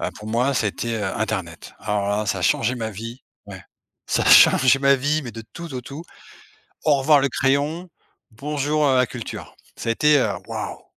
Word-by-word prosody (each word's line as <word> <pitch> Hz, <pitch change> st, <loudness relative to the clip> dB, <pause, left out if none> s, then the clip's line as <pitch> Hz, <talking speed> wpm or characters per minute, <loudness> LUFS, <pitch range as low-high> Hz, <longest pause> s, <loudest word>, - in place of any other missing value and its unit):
heu, -, -, -2 dB
pour 105 Hz, 0 st, -9 dB
moi 125 Hz, +5 st, 0 dB
ça 110 Hz, -3 st, +1 dB
a -, -, +2 dB
été, 115 Hz, +3 st, -4 dB
heu, 110 Hz, -2 st, -3 dB
internet. 95 Hz, -7 st, -4 dB
Alors 100 Hz, -1 st, -2 dB
là, 105 Hz, +1 st, -1 dB
ça 95 Hz, -, -1 dB
a -, -, -5 dB
changé 115 Hz, +7 st, +1 dB
ma 110 Hz, -2 st, -4 dB
vie. 115 Hz, +4 st, -9 dB, 0.2 s
Ouais. -, -, -10 dB, 0.4 s
Ça -, -, 0 dB
a -, -, -2 dB
changé 130 Hz, +1 st, +7 dB
ma 140 Hz, 0 st, +4 dB
vie 145 Hz, +4 st, 0 dB
mais 120 Hz, -3 st, -8 dB
de 115 Hz, -, -8 dB
tout 170 Hz, -4 st, -8 dB
au 125 Hz, -, -4 dB
tout. 140 Hz, +6 st, -9 dB, 0.8 s
Au 150 Hz, -3 st, +3 dB
revoir 145 Hz, +2 st, +4 dB
le 140 Hz, -, +2 dB
crayon, 145 Hz, +7 st, -1 dB, 0.4 s
bonjour, 145 Hz, +5 st, -1 dB
heu, 130 Hz, -2 st, +3 dB
la 125 Hz, -1 st, +3 dB
culture. 120 Hz, -2 st, -8 dB, 0.2 s
Ça -, -, -4 dB
a -, -, +3 dB
été, 150 Hz, +4 st, +3 dB
heu, 110 Hz, -, +1 dB, 0.2 s
waouh! -, -, -6 dB
130 Hz, 215 wpm, -22 LUFS, 110-145 Hz, 0.8 s, changé